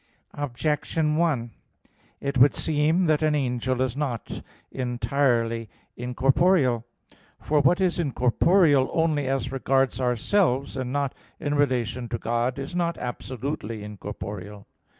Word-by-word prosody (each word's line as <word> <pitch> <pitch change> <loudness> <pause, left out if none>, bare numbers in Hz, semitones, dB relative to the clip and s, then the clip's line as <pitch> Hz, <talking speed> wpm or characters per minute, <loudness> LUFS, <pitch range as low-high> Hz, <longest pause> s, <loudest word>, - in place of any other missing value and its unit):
Objection 150 +3 -1
1: 145 -9 0 0.7
It 140 -2 -1
would 135 +3 +6
seem 160 +4 +2
that 155 -2 +2
an 155 -1 +2
angel 130 -2 0
is 130 -2 -2
not 135 -6 -3 0.3
entirely 120 -3 0 0.3
incorporeal. 130 +1 +2 0.6
For 150 0 +1
what 160 +6 +3
is 185 -2 +1
incorporeal 145 +1 +3
only 155 -4 +1
as 135 0 -1
regards 135 0 +1
ourselves, 130 - +1
and 130 -2 -3
not 140 -1 -1 0.3
in 145 - -2
relation 125 -4 0
to 120 - -2
God, 120 +3 -1
is 140 +5 -6
not 170 -1 0
absolutely 125 -3 -5
incorporeal. 105 -1 -7
135 Hz, 120 wpm, -25 LUFS, 120-150 Hz, 0.7 s, would